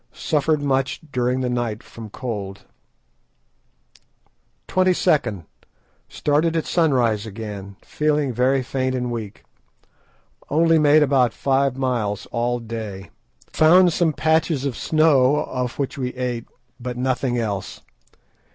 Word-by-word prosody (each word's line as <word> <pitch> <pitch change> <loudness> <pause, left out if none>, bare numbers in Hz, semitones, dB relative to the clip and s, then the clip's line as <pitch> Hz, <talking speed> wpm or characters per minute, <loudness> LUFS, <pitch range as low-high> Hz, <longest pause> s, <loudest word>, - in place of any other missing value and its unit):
Suffered 150 -1 0
much 135 -1 0
during 125 0 0
the 125 - -1
night 120 -2 -2
from 115 -2 -10
cold. 100 -5 -6 2.0
"22nd.—Started 155 - -1
at 160 - -1
sunrise 120 - +1
again, 100 -2 -7
feeling 150 -3 0
very 130 +3 +2
faint 130 0 -2
and 125 -1 -2
weak. 110 -3 -6 1.1
Only 165 +2 +3
made 150 0 +5
about 130 -4 +2
five 135 -1 +1
miles 120 -6 -1
all 120 +1 0
day; 110 -5 -7 0.3
found 175 +2 +5
some 165 -1 +2
patches 160 -2 +1
of 135 -4 -2
snow, 150 -3 +3
of 125 -1 -4
which 140 0 -3
we 125 -1 -3
ate, 125 -2 -3 0.3
but 125 0 -5
nothing 125 0 -1
else. 100 -5 -4
130 Hz, 115 wpm, -22 LUFS, 115-150 Hz, 2.0 s, made